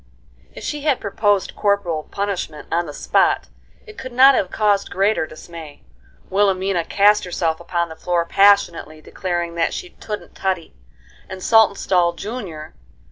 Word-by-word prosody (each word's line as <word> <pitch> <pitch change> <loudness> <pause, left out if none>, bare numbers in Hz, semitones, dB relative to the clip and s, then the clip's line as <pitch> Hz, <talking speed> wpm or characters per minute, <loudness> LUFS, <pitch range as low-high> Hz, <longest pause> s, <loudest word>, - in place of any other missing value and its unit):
If - - -9
she 295 -1 -4
had 285 -3 +1
proposed 205 -1 0
corporal 200 -6 0
punishment 195 -7 -4
on 170 0 0
the - - -6
spot - - +1 0.4
it 430 -1 -12
could 260 -1 -7
not 265 +3 +7
have 190 -8 0
caused 205 -1 +1
greater 195 -3 +1
dismay. 160 -2 -11 0.5
Wilhelmina 190 -3 +1
cast 205 +1 +4
herself 165 -3 -2
upon 170 0 -2
the 160 - -9
floor 175 0 -1
passionately, 195 -5 +3
declaring 175 +1 -4
that 170 -1 -1
she 365 -1 -7
"touldn't 210 -1 -7
tuddy," 185 -4 -3 0.6
and 190 -1 -8
Saltonstall, 195 -5 +3
Jr. 175 -6 -7
190 Hz, 140 wpm, -20 LUFS, 170-205 Hz, 0.6 s, not